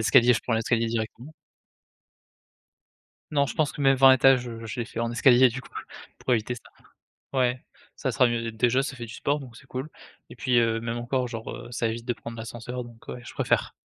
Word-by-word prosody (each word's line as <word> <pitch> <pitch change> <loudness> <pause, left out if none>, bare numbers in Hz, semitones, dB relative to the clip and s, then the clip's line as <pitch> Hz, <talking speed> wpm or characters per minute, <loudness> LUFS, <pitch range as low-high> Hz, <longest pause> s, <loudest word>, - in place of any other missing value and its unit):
escaliers, 125 +2 +6
je 115 - -1
prends 125 - 0
l'escalier 115 +1 +1
directement. 115 +5 -4 2.0
Non, 140 -2 +3
je - - -5
pense 150 -3 +1
que, 145 - -5
même, 135 0 +5
20 135 0 +8
étages, 130 -1 +5
heu, 115 -1 -8
je 110 +2 -4
les 115 - -3
fait - - -5
en 115 0 -1
escalier, 125 +1 +6
du 130 +4 -5
coup, 135 - -15 0.5
pour 130 - -1
éviter 120 +1 +1
ça. 120 - -12 0.8
Ouais, 125 0 +1 0.3
ça - - -1
sera 125 - +4
mieux, 120 -1 0
dé - - -15
déjà, 120 +4 +2
ça 135 -1 -5
fait 120 -1 -6
du 110 - -10
sport 145 +1 0
donc 125 -4 -11
c'est - - -15
cool 130 +4 -5 0.4
et - - -11
puis, 125 -3 +2
heu, 115 -1 +2
même 115 0 -3
encore, 125 +1 -1
genre, 115 -2 -6
heu, - - -9
ça 120 - -1
évite 115 +1 -4
de 120 - +1
prendre 115 -1 -9
l'ascenseur 120 +2 -6
donc 120 -1 -15
ouais, 125 - -6
je - - -9
préfère. - - +1
120 Hz, 225 wpm, -26 LUFS, 115-130 Hz, 2.0 s, 20